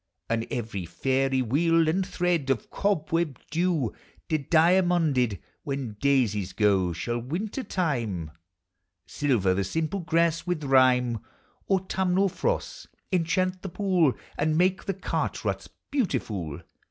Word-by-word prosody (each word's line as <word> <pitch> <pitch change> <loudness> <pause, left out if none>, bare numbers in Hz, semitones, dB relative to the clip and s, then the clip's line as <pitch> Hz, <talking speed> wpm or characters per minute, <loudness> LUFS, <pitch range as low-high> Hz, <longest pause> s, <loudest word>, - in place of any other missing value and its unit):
And 115 0 0
every 105 -7 -4
fairy 130 +7 +1
wheel 165 +6 +3
and 180 +5 +2
thread 175 -6 0
Of 130 -5 -1
cobweb 165 -6 0
dew 165 - +1 0.4
dediamonded. 160 - +3 0.2
When 135 -5 -4
daisies 110 -9 +1
go, 95 -4 +2
shall 120 +8 -2
winter 180 - -3
time 115 - -2 0.7
Silver 120 -11 +1
the 100 +1 0
simple 160 - -2
grass 170 -1 +1
with 175 -4 -1
rime; 130 -3 +4 0.5
Autumnal 190 0 +2
frosts - - -2 0.2
enchant 185 +1 +1
the 195 - -5
pool 180 -7 +2 0.3
And 155 +1 +2
make 185 +2 +2
the 195 - -2
cart 195 - -2
ruts - - -2 0.2
beautiful. 115 - -2
155 Hz, 115 wpm, -27 LUFS, 120-180 Hz, 0.7 s, rime